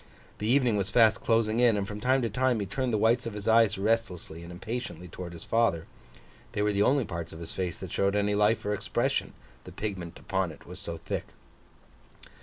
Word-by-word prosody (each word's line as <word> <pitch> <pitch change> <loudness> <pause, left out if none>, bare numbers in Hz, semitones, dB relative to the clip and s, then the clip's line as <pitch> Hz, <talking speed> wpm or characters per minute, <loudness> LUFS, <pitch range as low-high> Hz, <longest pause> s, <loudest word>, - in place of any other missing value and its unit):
The 105 - -2
evening 125 -3 +3
was 100 0 0
fast 110 -1 +4
closing 115 0 +2
in; 120 -3 +5
and 100 -1 -2
from 105 +1 -6
time 130 +2 +2
to 115 - 0
time, 125 +1 +2
he 100 - -1
turned 125 +6 -2
the 110 - +2
whites 115 +3 +2
of 115 - -5
his 105 0 -6
eyes 110 -2 +5
restlessly 95 -6 -1
and 85 +1 -9
impatiently 95 0 -5
towards 90 0 -8
his 85 - -9
father. 115 -8 +1 0.7
They 105 - 0
were 105 0 +2
the 100 - +1
only 130 +3 +3
parts 85 -2 -5
of 80 - -9
his 85 -1 -6
face 90 -3 -3
that - - -8
showed 100 +1 +1
any 105 0 +2
life 105 +2 +2
or 105 - 0
expression, 105 - -1 0.3
the - - -10
pigment 95 -6 -5
upon 95 -3 -1
it 75 - -14
was - - -9
so 85 - -4
thick. - - -4
105 Hz, 215 wpm, -28 LUFS, 95-115 Hz, 0.7 s, in